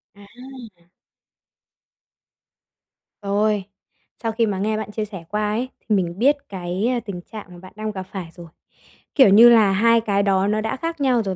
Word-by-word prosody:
À! 225 Hz, -3 st, -14 dB, 2.3 s
Rồi. 205 Hz, 0 st, 0 dB, 0.6 s
Sau 225 Hz, -, 0 dB
khi 225 Hz, +1 st, +1 dB
mà 200 Hz, -3 st, -2 dB
nghe 215 Hz, +2 st, -1 dB
bạn 215 Hz, -1 st, -5 dB
chia 215 Hz, 0 st, -3 dB
sẻ 195 Hz, -5 st, -9 dB
qua 210 Hz, 0 st, -1 dB
ấy 240 Hz, +4 st, -2 dB
thì 215 Hz, -, -1 dB
mình 175 Hz, -1 st, -2 dB
biết 280 Hz, +5 st, +4 dB
cái 195 Hz, +6 st, -2 dB
tình 190 Hz, -4 st, -6 dB
trạng 215 Hz, +3 st, -10 dB
mà 175 Hz, -, -12 dB
bạn 185 Hz, +1 st, -14 dB
đang 215 Hz, 0 st, -4 dB
gặp 190 Hz, -2 st, -6 dB
phải 185 Hz, -2 st, -8 dB
rồi. 175 Hz, -1 st, -11 dB, 0.7 s
Kiểu 265 Hz, -7 st, +7 dB
như 225 Hz, +5 st, +8 dB
là 220 Hz, -4 st, +5 dB
hai 230 Hz, +4 st, +3 dB
cái 200 Hz, -2 st, 0 dB
đó 195 Hz, -1 st, +2 dB
nó 215 Hz, +1 st, 0 dB
đã 220 Hz, +3 st, -3 dB
khác 330 Hz, +1 st, -5 dB
nhau 250 Hz, -4 st, +2 dB
rồi, 190 Hz, -2 st, -3 dB
210 Hz, 180 wpm, -21 LUFS, 195-230 Hz, 2.3 s, như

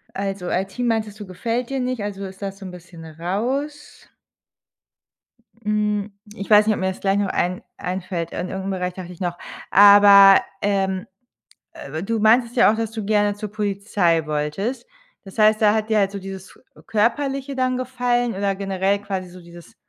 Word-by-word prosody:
also, 195 Hz, -2 st, -4 dB
IT 190 Hz, +1 st, -2 dB
meintest 220 Hz, -3 st, -1 dB
du, 205 Hz, -, -7 dB
gefällt 230 Hz, +6 st, -3 dB
dir 270 Hz, -, -1 dB
nicht, 250 Hz, -4 st, -2 dB
also, 200 Hz, -1 st, -5 dB
ist 190 Hz, +1 st, -11 dB
das 195 Hz, 0 st, -5 dB
so 195 Hz, -, -9 dB
‘n 185 Hz, -, -7 dB
bisschen 175 Hz, -2 st, -12 dB
raus. 235 Hz, -, -4 dB, 1.5 s
Hm, 210 Hz, -1 st, -1 dB, 0.2 s
ich 200 Hz, -1 st, -8 dB
weiß 210 Hz, 0 st, +6 dB
nicht, 215 Hz, -, +4 dB
ob -, -, -6 dB
mir 190 Hz, -, +1 dB
das 190 Hz, -, -6 dB
gleich 195 Hz, 0 st, +1 dB
noch 205 Hz, -, 0 dB
ein 180 Hz, +1 st, -1 dB, 0.2 s
einfällt, 180 Hz, -2 st, -4 dB
an 180 Hz, -, -3 dB
irgendeinen 190 Hz, +1 st, -4 dB
Bereich 180 Hz, -1 st, -3 dB
dachte 180 Hz, -1 st, -9 dB
ich 175 Hz, -, -13 dB
noch. 175 Hz, -1 st, -2 dB, 0.3 s
Aber, 200 Hz, -1 st, +8 dB, 0.2 s
ähm, 190 Hz, -2 st, 0 dB, 0.7 s
äh, 155 Hz, +4 st, -7 dB
du 225 Hz, +3 st, -2 dB
meintest 235 Hz, +3 st, +3 dB
ja 215 Hz, -, +6 dB
auch, -, -, -2 dB
dass 225 Hz, -1 st, -2 dB
du 220 Hz, -2 st, -5 dB
gerne 205 Hz, -1 st, +1 dB
zur 210 Hz, 0 st, -7 dB
Polizei 200 Hz, -5 st, 0 dB
wolltest. 155 Hz, -, -3 dB, 0.4 s
Das 195 Hz, +3 st, -13 dB
heißt, 215 Hz, 0 st, +4 dB
da 210 Hz, 0 st, +4 dB
hat 220 Hz, 0 st, -1 dB
dir 220 Hz, -, +3 dB
halt 195 Hz, 0 st, +1 dB
so 200 Hz, -, -5 dB
dieses 190 Hz, 0 st, -10 dB, 0.3 s
körperliche 270 Hz, +5 st, -1 dB
dann 255 Hz, -1 st, 0 dB
gefallen 245 Hz, -2 st, -1 dB
oder 195 Hz, 0 st, -1 dB
generell 195 Hz, 0 st, -1 dB
quasi 190 Hz, -3 st, -5 dB
so 180 Hz, +1 st, -13 dB
dieses, 170 Hz, -1 st, -15 dB
200 Hz, 180 wpm, -21 LUFS, 190-220 Hz, 1.5 s, Aber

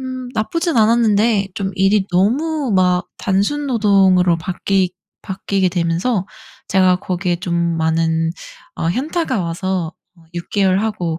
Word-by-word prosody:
음 255 Hz, -1 st, -6 dB
나쁘진 330 Hz, +9 st, -1 dB
않았는데 220 Hz, -2 st, +3 dB
좀 195 Hz, -1 st, -3 dB
일이 195 Hz, +1 st, +3 dB
너무 265 Hz, -, +1 dB
막 180 Hz, -1 st, +2 dB
단순 205 Hz, +10 st, 0 dB
노동으로 195 Hz, -7 st, +3 dB
바뀌 185 Hz, +2 st, -1 dB, 0.3 s
바뀌게 195 Hz, -1 st, -1 dB
되면서 175 Hz, +4 st, -1 dB, 0.4 s
제가 185 Hz, -1 st, +3 dB
거기에 180 Hz, -1 st, -2 dB
좀 175 Hz, 0 st, -4 dB, 0.2 s
많은 160 Hz, 0 st, 0 dB, 0.4 s
어 165 Hz, -, -1 dB
현타가 270 Hz, -, -1 dB
와서 175 Hz, 0 st, -2 dB, 0.2 s
어 165 Hz, -, -21 dB
6 170 Hz, 0 st, -6 dB
개월 195 Hz, -2 st, +2 dB
하고 180 Hz, -7 st, -2 dB
190 Hz, 250 characters per minute, -18 LUFS, 175-220 Hz, 0.4 s, 않았는데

